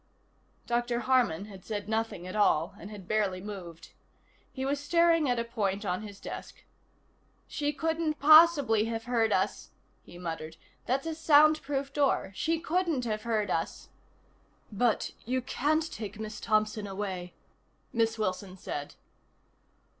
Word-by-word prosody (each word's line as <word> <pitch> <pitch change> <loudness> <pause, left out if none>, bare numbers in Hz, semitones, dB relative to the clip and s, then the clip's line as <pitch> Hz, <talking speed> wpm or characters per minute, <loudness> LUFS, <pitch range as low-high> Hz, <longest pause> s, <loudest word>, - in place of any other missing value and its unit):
Dr. 240 0 0
Harman 240 -9 +2
had 195 -3 -12
said 205 -3 -4
nothing 220 -4 -2
at 185 - -6
all, 170 -6 +2
and 200 - -9
had 205 -4 -10
barely 205 -4 0
moved. 185 -5 -9 0.6
He 265 0 -4
was 280 +1 0
staring 330 0 +3
at 245 - +1
a 235 - 0
point 210 -4 -2
on 180 +1 -1
his 205 -2 -9
desk. - - -8 0.8
"She 290 0 -1
couldn't 320 +1 -1
possibly 290 -7 +6
have 225 0 -3
heard 230 -2 +1
us," 190 +1 0 0.3
he 175 - -13
muttered. 165 -2 -6 0.3
"That's 270 +3 0
a 325 - -2
soundproof 290 -3 +3
door. 275 -9 +1
She 325 +10 0
couldn't 330 -6 0
have 215 -2 -2
heard 215 -4 -1
us." 165 - -3 0.8
"But 225 +2 +1
you 255 +3 0
can't 295 +5 0
take 210 -1 -7
Miss 215 -1 -6
Thompson 215 -1 0
away," 190 -3 -5 0.6
Miss 225 -1 +1
Wilson 190 -2 -3
said. 145 -5 -6
225 Hz, 140 wpm, -29 LUFS, 200-280 Hz, 0.8 s, possibly